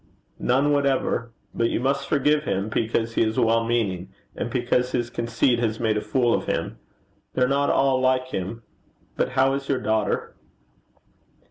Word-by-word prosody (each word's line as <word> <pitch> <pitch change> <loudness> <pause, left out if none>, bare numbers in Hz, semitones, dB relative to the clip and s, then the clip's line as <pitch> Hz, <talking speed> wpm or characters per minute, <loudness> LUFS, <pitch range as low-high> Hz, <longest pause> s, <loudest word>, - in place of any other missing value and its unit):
'None 135 +4 +2
whatever. 135 -4 0 0.2
But 115 0 +1
you - - -1
must 140 +2 -1
forgive 150 +1 +2
him, 95 +3 -1
because 115 +1 -1
he - - +1
is 110 -1 0
well 115 0 +3
meaning, 105 -6 -1 0.3
and - - -3
because 125 0 0
his 120 -1 -1
conceit 115 +1 +1
has 110 -2 -1
made 110 -2 +1
a 105 - 0
fool 120 +2 +1
of - - -1
him. - - -2 0.6
They're 125 -1 +3
not 140 +1 +1
all 135 -1 +2
like 130 0 +1
him. 115 +1 -5 0.5
But - - -1
how 135 +1 +3
is 140 0 -4
your 135 -2 +1
daughter?' 110 +1 -1
120 Hz, 165 wpm, -24 LUFS, 115-135 Hz, 0.6 s, well